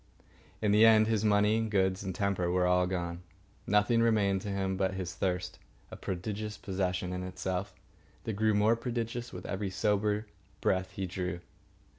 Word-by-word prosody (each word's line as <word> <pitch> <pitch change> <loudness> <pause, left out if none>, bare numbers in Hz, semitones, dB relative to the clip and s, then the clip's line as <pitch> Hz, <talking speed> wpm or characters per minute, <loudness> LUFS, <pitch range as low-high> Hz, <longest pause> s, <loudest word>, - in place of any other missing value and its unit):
In 105 - +3
the 105 +2 +6
end 110 -1 +7
his 110 -1 0
money 105 +1 +3
and 115 -1 -1
goods 95 -2 +1
and 95 -2 -4
temper 100 -3 0
were 90 0 +2
all 90 0 +3
gone. 85 -1 -3 0.5
Nothing 105 +3 +3
remained 100 -4 +2
to 105 - -5
him 95 -1 -1
but 95 0 0
his 90 -2 -4
thirst, 90 0 -2 0.3
a - - -6
prodigious 105 +3 -4
possession 90 -2 -2
in 90 - -3
itself 95 +1 -4 0.5
that 110 - -3
grew 110 +1 +2
more 105 +3 +4
prodigious 120 0 -4
with 90 - -8
every 100 0 -3
sober 105 +2 0 0.3
breath 95 0 0
he 95 - -3
drew. 90 -1 -4
100 Hz, 170 wpm, -31 LUFS, 90-105 Hz, 0.5 s, end